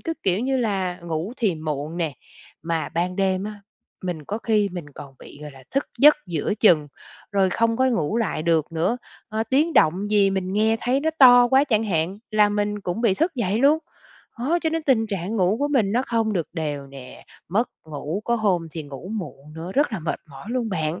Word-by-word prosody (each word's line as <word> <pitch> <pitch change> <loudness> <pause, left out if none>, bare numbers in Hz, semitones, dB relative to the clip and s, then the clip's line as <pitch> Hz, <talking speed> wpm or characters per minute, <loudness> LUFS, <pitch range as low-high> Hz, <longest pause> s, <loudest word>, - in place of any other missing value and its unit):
cứ, 330 - -3
kiểu 190 +2 +1
như 265 +1 0
là, 195 -7 -1
ngủ 170 +5 -4
thì 210 -8 +1
muộn 155 0 -4
nè, 160 -6 -2 0.5
mà 165 -1 -2
ban 180 +2 -2
đêm 190 -1 +1
á, 210 -1 -7 0.4
mình 170 -4 -4
có 210 +8 -4
khi 215 -3 +1
mình 175 -4 -6
còn 135 -2 -10
bị, - - -13
gọi 150 - -7
là, 135 -2 -15
thức 275 +1 0
giấc 295 +2 +8
giữa 170 +4 -1
chừng, 160 -9 +5 0.4
rồi 195 -2 +3
không 230 +3 +1
có 260 - +2
ngủ 220 - 0
lại 190 -8 -1
được 165 -1 +1
nữa. 170 +8 0 0.3
Ơ, 220 0 -1
tiếng 300 +6 +3
động 190 +6 +3
gì 200 -2 +4
mình 190 -1 -2
nghe 220 +2 +2
thấy 255 +3 +1
nó 320 +2 +1
to 245 -2 +8
quá 270 +2 +5
chẳng 225 -6 +1
hạn, 180 0 -1
là 210 -1 +4
mình 205 0 -1
cũng 180 +2 -3
bị 230 -5 +3
thức 325 - 0
dậy 215 -4 0
luôn. 285 +5 +5 0.6
Đó, 290 +9 +1
cho 320 - +1
nên 325 0 -1
tình 240 -6 +2
trạng 200 +1 -3
ngủ 190 +2 +2
của 290 - +1
mình 225 -9 +2
nó 245 - +2
không 225 -4 0
được 170 -6 -2
đều 145 -4 -3
nè, 135 -2 -12 0.2
mất 215 +7 0 0.2
ngủ, 155 +5 -4
có 235 - +1
hôm 195 -6 +1
thì 160 - -5
ngủ 145 +6 -9
muộn 180 -8 -6 0.2
nữa, 170 +3 -6
rất 280 0 +2
là 215 - -2
mệt 160 -1 -3
mỏi 135 +5 -11
luôn 240 -2 -1
bạn. 160 -3 -2
200 Hz, 220 wpm, -23 LUFS, 165-230 Hz, 0.6 s, giấc